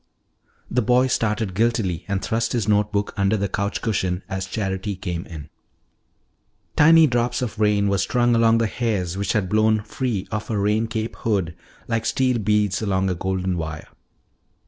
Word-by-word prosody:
The 125 - +2
boy 125 +3 +3
started 110 -5 -1
guiltily 100 -5 0
and 100 -1 -2
thrust 115 0 -1
his 115 -4 -1
note 105 0 +2
book 100 -1 -1
under 100 +2 +2
the 100 0 -1
couch 100 +2 -3
cushion 95 -5 -1
as 95 0 -4
Charity 95 0 -3
came 90 -2 -5
in. 75 -3 -9 1.3
Tiny 160 +1 +7
drops 120 -2 0
of 110 -2 -5
rain 105 -1 +2
were 100 -1 +1
strung 120 +5 +2
along 115 0 +4
the 115 - +2
hairs 105 -6 -2
which 100 -1 -1
had 105 -5 0
blown 110 +1 +2
free 115 -5 -3
of 105 0 -3
her 110 -3 -1
rain 105 +3 +1
cape 110 0 -4
hood 95 -8 -1 0.3
like 115 -1 -1
steel 130 -2 +1
beads 105 -1 +1
along 95 -2 0
a - - +1
golden 95 0 -2
wire. 80 -1 -6
105 Hz, 170 wpm, -22 LUFS, 95-115 Hz, 1.3 s, Tiny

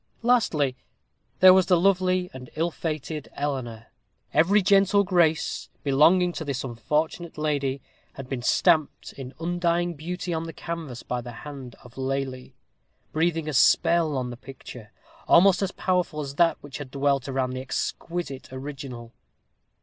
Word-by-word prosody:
Lastly, 170 - +2 0.7
there 185 0 +10
was 190 -1 +4
the 180 -3 +4
lovely 185 -1 +2
and 125 -1 -10
ill 165 +2 0
fated 155 -2 -4
Eleanor. 125 -6 -4 0.5
Every 190 +7 +4
gentle 200 +1 +4
grace 170 -5 +1
belonging 165 +6 +4
to 160 - -5
this 140 -4 -3
unfortunate 150 +8 -2
lady 140 -3 -1 0.3
had 135 -1 -9
been 130 -2 -4
stamped 155 +4 +2
in 135 -1 -9
undying 175 0 0
beauty 175 +3 -5
on 165 0 -2
the 165 - -7
canvas 160 -7 -6
by 125 0 -3
the 120 0 -8
hand 135 -5 -8
of 125 +2 -13
Lely, 130 -1 -3 0.6
breathing 165 0 0
a 155 - -2
spell 155 +3 +3
on 125 -1 -3
the 120 - -8
picture, 125 -4 -11 0.4
almost 190 +2 +6
as 195 -1 0
powerful 180 -5 -1
as 140 -1 -5
that 165 +3 +3
which 145 -1 -9
had 145 -3 -7
dwelt 140 -1 0
around 130 -1 -1
the 130 0 -4
exquisite 140 +1 -4
original. 130 -3 -8
150 Hz, 150 wpm, -25 LUFS, 130-175 Hz, 0.7 s, there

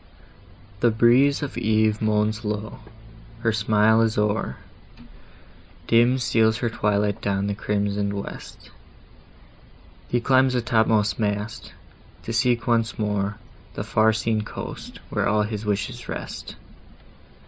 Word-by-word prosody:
The 120 - +4
breeze 125 +6 +4
of 145 - -4
Eve 110 0 +1
moans 110 0 0
low, 105 +1 -4 0.6
her 115 -1 +2
smile 110 0 +3
is 115 -1 +1
o'er, 105 +1 0 1.3
Dim 120 +3 +4
steals 110 -3 +2
her 120 -1 -2
twilight 105 -1 0
down 100 -1 -1
the 100 - -1
crimson'd 100 0 -1
west, 100 0 -8 1.4
He 120 - 0
climbs 130 +1 +3
the 125 - +1
top 115 -2 +2
most 110 -1 +1
mast, 105 0 -3 0.5
to 115 - -5
seek 120 0 +1
once 115 -1 +1
more 105 -1 -1 0.4
The - - -3
far 110 +1 +3
seen 110 0 0
coast, 105 - -8
where - - 0
all 105 0 +2
his 105 0 -5
wishes 105 +4 -3
rest. - - -6
110 Hz, 125 wpm, -23 LUFS, 105-115 Hz, 1.4 s, The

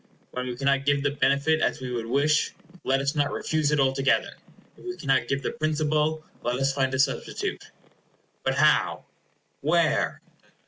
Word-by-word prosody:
When 125 0 -4
we 125 - -4
cannot 140 +1 +1
give 140 0 +2
the 145 - +1
benefit 140 +2 +2
as - - 0
we 130 -1 -5
would 115 -2 -3
wish, 145 +5 +2 0.3
let 135 +1 +1
us 140 +1 0
not 145 -2 0
refuse 155 -2 0
it 150 -1 +1
altogether. 135 0 +2 0.4
If - - -17
we 365 0 -5
cannot 130 -3 +1
give 135 +1 -1
the - - -1
principal, 155 0 0 0.2
let 120 +1 -1
us 135 0 +1
find 135 -1 0
a - - 0
substitute. 135 - -1 0.8
But - - 0
how? - - +3 0.6
Where? 160 +2 +1
140 Hz, 170 wpm, -26 LUFS, 135-155 Hz, 0.8 s, how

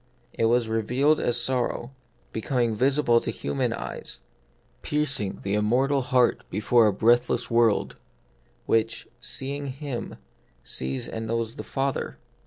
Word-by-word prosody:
It 115 - 0
was 120 0 +3
revealed 125 +7 +2
as 120 0 +1
sor 125 0 +1
row, 120 - -6 0.4
becoming 115 +1 0
visible 130 0 +3
to - - -4
human 70 0 -1
eyes; - - -6 0.6
pierc 150 -1 +1
ing 100 -2 -4
the 100 - -1
immortal 125 +7 +2
heart 125 -1 +2
before 110 +3 +3
a - - +4
breathless 120 +5 +2
world, 115 -3 +2 0.7
which, 115 0 0
seeing 140 +3 -4
Him, 135 -2 -5 0.5
sees 65 +1 -3
and 110 0 -5
knows 115 0 -1
the - - -6
Father. 135 0 -2
120 Hz, 135 wpm, -26 LUFS, 110-135 Hz, 0.7 s, a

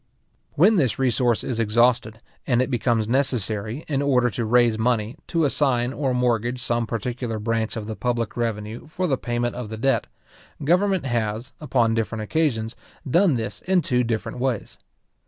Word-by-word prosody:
When 200 +8 +5
this 130 - +2
resource 125 -3 +2
is 120 -3 -3
exhausted, 115 0 +2 0.2
and 120 -3 +3
it 130 +2 0
becomes 115 -2 +1
necessary, 115 -1 -1
in 140 -3 0
order 125 -4 +2
to 115 - -2
raise 120 -1 +3
money, 115 -1 0
to 165 -2 +1
assign 130 -3 +1
or 135 -2 -1
mortgage 125 -1 0
some 120 -1 0
particular 115 0 -3
branch 115 +1 -1
of 110 - -4
the 110 0 -5
public 120 -2 -2
revenue 115 +1 -3
for 180 +4 -2
the 145 -6 +2
payment 120 -1 -2
of 120 -3 -5
the 110 - -6
debt, 120 0 +1 0.6
government 180 +3 +2
has, 115 0 -2
upon 120 -6 +2
different 115 -1 -2
occasions, 115 -4 0 0.3
done 170 +2 +4
this 110 -3 -4
in 185 -2 +2
two 125 -1 +1
different 115 +1 -3
ways. 125 -4 -2
120 Hz, 165 wpm, -23 LUFS, 115-135 Hz, 0.6 s, When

